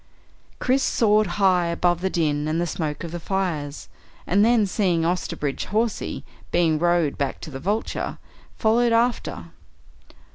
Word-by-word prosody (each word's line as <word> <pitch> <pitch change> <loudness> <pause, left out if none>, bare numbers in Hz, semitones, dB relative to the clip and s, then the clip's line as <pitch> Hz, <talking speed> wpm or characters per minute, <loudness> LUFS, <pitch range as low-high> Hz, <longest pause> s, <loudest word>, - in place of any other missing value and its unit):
Chris 260 +2 +1
soared 215 -4 +3
high 185 -3 +3
above 175 +1 +1
the 190 - 0
din 150 -4 0
and 155 +2 0
the 175 - +1
smoke 155 -3 -3
of 170 - -6
the 175 - -4
fires, 165 -6 -3 0.4
and 200 +3 +3
then 230 -1 +4
seeing 180 -4 +1
Osterbridge 165 -5 -2
Hawsey 220 +1 -2 0.3
being 160 -3 +2
rowed 175 -3 +1
back 140 -2 -2
to 155 - -8
the 135 - -6
Vulture, 205 +9 -2 0.4
followed 235 +1 +3
after. 235 +1 0
175 Hz, 145 wpm, -23 LUFS, 160-210 Hz, 0.4 s, then